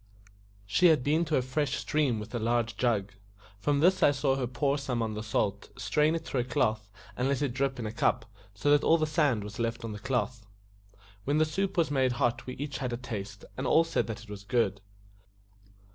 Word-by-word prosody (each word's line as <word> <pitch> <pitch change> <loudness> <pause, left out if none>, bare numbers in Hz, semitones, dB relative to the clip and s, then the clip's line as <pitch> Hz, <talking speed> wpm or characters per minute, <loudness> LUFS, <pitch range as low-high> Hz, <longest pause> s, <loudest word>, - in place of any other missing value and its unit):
She 105 - +4
had 155 -6 +4
been 155 +5 +2
to 155 -1 0
a 130 - +1
fresh 135 +1 -1
stream 140 -7 0
with 105 - -8
a 120 - -1
large 115 -1 0
jug; 105 -4 0 0.5
from 145 +6 +1
this 185 +3 +4
I - - +7
saw 135 -1 +1
her 130 -2 -1
pour 140 +4 0
some 130 -3 -2
on 110 -1 -2
the 105 - -4
salt, 105 -2 -1
strain 150 +8 +2
it 165 -1 -4
through 135 - -2
a - - +1
cloth, 110 -4 0 0.3
and 125 - 0
let 140 +1 0
it 135 -4 -1
drip 135 0 -1
in 120 - -4
a 105 - -3
cup, 115 - +1 0.3
so 105 +9 +1
that 145 0 +5
all 165 - +5
the 155 - +1
sand 150 - +1
was 105 +1 -8
left 115 0 -2
on 115 - -4
the 105 - -6
cloth. 125 -2 -2 0.8
When 145 +2 +1
the 155 - +4
soup 190 +5 -2
was 165 -4 +2
made 130 -3 +2
hot 120 0 0
we 125 - -4
had - - -9
each 145 -2 -4
a 125 -2 -2
taste, 105 -5 -6
and 130 0 -3
all 165 - +5
said 165 - -1
that 115 0 -6
it 115 - -16
was 100 -1 -8
good. 105 -4 0
125 Hz, 230 wpm, -29 LUFS, 110-145 Hz, 0.8 s, I